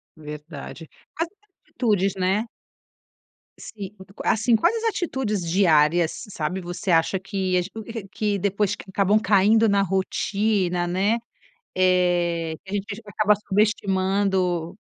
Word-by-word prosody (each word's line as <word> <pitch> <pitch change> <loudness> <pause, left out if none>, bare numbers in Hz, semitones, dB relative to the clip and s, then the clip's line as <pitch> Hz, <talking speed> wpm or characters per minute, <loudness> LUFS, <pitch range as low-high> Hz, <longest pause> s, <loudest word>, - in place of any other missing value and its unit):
Verdade. 150 +1 -9 0.3
As 330 - +1 0.4
atitudes, 200 -5 +1
né? 190 +4 0 1.1
Sim. 200 -3 -8
U 190 - -11
co 195 - -20
Assim, 225 +2 +3
quais 220 - +2
as 455 - +3
atitudes 265 - -2
diárias, 165 0 +3
sabe, 180 0 -3
você 180 +3 -3
acha 165 +3 +3
que 190 -1 -1
a - - +3
ge 185 - -8
o 225 -2 -7
que 210 -1 -1
depois 200 +1 0
que - - -12
acabam 200 +2 +3
caindo 215 +2 +4
na 200 -1 +3
rotina, 195 -1 0
né, 195 +6 +1 0.6
eh, 175 -3 +2
que 190 - -11
a - - -1
gente 205 +1 -4
acaba 210 +1 +3
subestimando? 190 -4 0
195 Hz, 135 wpm, -24 LUFS, 180-210 Hz, 1.1 s, caindo